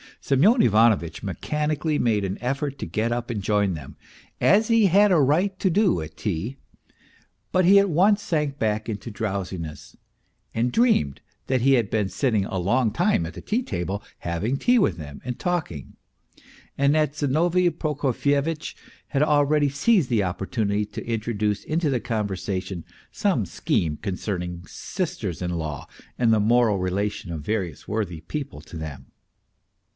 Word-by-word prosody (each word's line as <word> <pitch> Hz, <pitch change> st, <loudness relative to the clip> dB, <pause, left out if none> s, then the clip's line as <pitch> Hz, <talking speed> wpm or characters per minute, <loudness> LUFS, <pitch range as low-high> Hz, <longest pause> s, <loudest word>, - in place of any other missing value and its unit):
Semyon 190 Hz, -, +4 dB
Ivanovitch 105 Hz, -7 st, +3 dB
mechanically 150 Hz, -, -1 dB
made 110 Hz, -4 st, +2 dB
an 95 Hz, +1 st, -4 dB
effort 135 Hz, +2 st, -2 dB
to -, -, -4 dB
get 110 Hz, +7 st, -1 dB
up 120 Hz, 0 st, -2 dB
and 110 Hz, -4 st, -2 dB
join 100 Hz, -1 st, +1 dB
them, 75 Hz, -4 st, -10 dB, 0.4 s
as 215 Hz, +2 st, +4 dB
he 230 Hz, -2 st, +4 dB
had 200 Hz, +3 st, +5 dB
a 175 Hz, -, +5 dB
right 170 Hz, +8 st, +2 dB
to 190 Hz, -, +2 dB
do 185 Hz, -, +2 dB
at 80 Hz, 0 st, -8 dB
tea; 105 Hz, +6 st, -3 dB, 0.9 s
but 185 Hz, -1 st, +3 dB
he 195 Hz, +3 st, +7 dB
at 200 Hz, 0 st, +4 dB
once 200 Hz, +6 st, +4 dB
sank 150 Hz, -6 st, -1 dB
back 110 Hz, -1 st, -1 dB
into 110 Hz, +2 st, -5 dB
drowsiness, 95 Hz, -6 st, -5 dB, 0.6 s
and 120 Hz, +2 st, +1 dB
dreamed 225 Hz, -, +2 dB, 0.3 s
that 130 Hz, -2 st, +1 dB
he 135 Hz, +2 st, +4 dB
had 115 Hz, -6 st, +2 dB
been 105 Hz, -3 st, +1 dB
sitting 110 Hz, -7 st, +1 dB
a 95 Hz, -, -4 dB
long 110 Hz, +6 st, +2 dB
time 85 Hz, -6 st, +1 dB
at 85 Hz, -, -10 dB
the -, -, -7 dB
tea 230 Hz, +4 st, 0 dB
table, 95 Hz, -, -3 dB, 0.2 s
having 95 Hz, +10 st, -2 dB
tea 245 Hz, -, +3 dB
with 95 Hz, -, +2 dB
them 75 Hz, -3 st, -9 dB
and 125 Hz, 0 st, -4 dB
talking, 160 Hz, -, -3 dB, 0.8 s
and 140 Hz, +2 st, +3 dB
that 155 Hz, -2 st, +2 dB
Zinovy 170 Hz, +5 st, +2 dB
Prokofyevitch 145 Hz, 0 st, -1 dB, 0.3 s
had 140 Hz, -, 0 dB
already 150 Hz, -1 st, +3 dB
seized 155 Hz, -, +2 dB
the 115 Hz, -5 st, +2 dB
opportunity 100 Hz, +3 st, -1 dB
to 105 Hz, -, -8 dB
introduce 110 Hz, -2 st, -1 dB
into 155 Hz, 0 st, 0 dB
the 125 Hz, -, +1 dB
conversation 95 Hz, -6 st, -3 dB, 0.3 s
some 185 Hz, -, 0 dB
scheme 80 Hz, -2 st, -1 dB
concerning 90 Hz, -2 st, -4 dB
sisters 110 Hz, -, -4 dB
in 90 Hz, -, -2 dB
law 80 Hz, -4 st, -4 dB, 0.3 s
and 120 Hz, -2 st, +3 dB
the 110 Hz, -, +3 dB
moral 110 Hz, -1 st, +3 dB
relation 95 Hz, 0 st, -2 dB
of 80 Hz, -2 st, -4 dB
various 95 Hz, -4 st, -3 dB
worthy 95 Hz, -7 st, -3 dB
people 140 Hz, -, -6 dB
to 80 Hz, -, -10 dB
them. 75 Hz, -3 st, -7 dB
115 Hz, 160 wpm, -24 LUFS, 95-150 Hz, 0.9 s, he